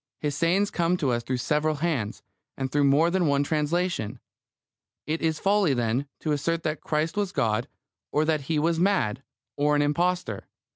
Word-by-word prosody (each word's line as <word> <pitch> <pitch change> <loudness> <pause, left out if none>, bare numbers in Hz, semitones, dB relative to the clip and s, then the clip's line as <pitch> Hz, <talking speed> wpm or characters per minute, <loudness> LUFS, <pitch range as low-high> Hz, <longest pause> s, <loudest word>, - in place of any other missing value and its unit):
His 145 -2 -2
sayings 185 +6 +2
come 175 +1 +1
to 145 -7 0
us 120 0 0
through 130 +2 -2
several 150 +4 0
hands, 140 -9 -2 0.3
and 130 -1 -3
through 145 +1 +3
more 150 +5 +4
than 180 -2 +2
one 140 0 +2
translation. 155 - -1 0.9
It 160 +2 -2
is 160 -1 +1
folly, 195 -7 +2
then, 120 +3 0
to 155 - -1
assert 165 +3 0
that 155 0 -2
Christ 155 +1 -1
was 205 -3 -1
God, 115 -3 0 0.4
or 150 +1 +2
that 155 -2 +1
He 160 - +1
was 165 +2 +1
mad, 170 - +1 0.4
or 150 +1 +2
an 145 - +3
impostor. 170 - -1
150 Hz, 180 wpm, -26 LUFS, 140-170 Hz, 0.9 s, more